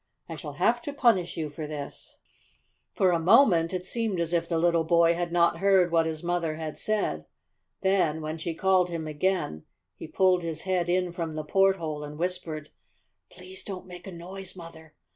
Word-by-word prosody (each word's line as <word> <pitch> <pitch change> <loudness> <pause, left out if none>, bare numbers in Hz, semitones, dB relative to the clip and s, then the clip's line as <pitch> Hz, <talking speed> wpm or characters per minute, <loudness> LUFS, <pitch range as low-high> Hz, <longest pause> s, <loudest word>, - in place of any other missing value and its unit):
I - - -6
shall - - -7
have - - +2
to 290 -3 -5
punish 225 -11 +2
you 160 -2 -2
for 150 +1 -7
this!" 145 -2 -8 0.7
For 190 -4 +2
a 170 - +2
moment 175 -3 +5
it 180 -1 -4
seemed 220 -3 -2
as 170 0 -1
if 170 -1 0
the 165 - +1
little 170 0 +3
boy 170 0 +4
had 175 0 -3
not 170 0 +3
heard 190 -3 +4
what 165 -1 +3
his 160 0 -4
mother 170 -2 -1
had 155 -1 -5
said. 195 - -1 0.6
Then, 185 -5 +2
when 155 +1 -5
she 165 0 -4
called 185 0 +3
him 165 -2 -4
again, 155 - -1 0.3
he - - -9
pulled 185 -1 +3
his 165 -2 -4
head 180 -2 0
in 180 0 +1
from 165 -2 -4
the 155 - -3
porthole 165 -3 +1
and 150 0 -8
whispered: 165 -3 -4 0.6
"Please 185 +1 -7
don't 190 -3 -7
make 180 -1 -11
a - - -6
noise, 185 +2 -6
Mother! 160 -3 -12
170 Hz, 190 wpm, -27 LUFS, 160-185 Hz, 0.7 s, moment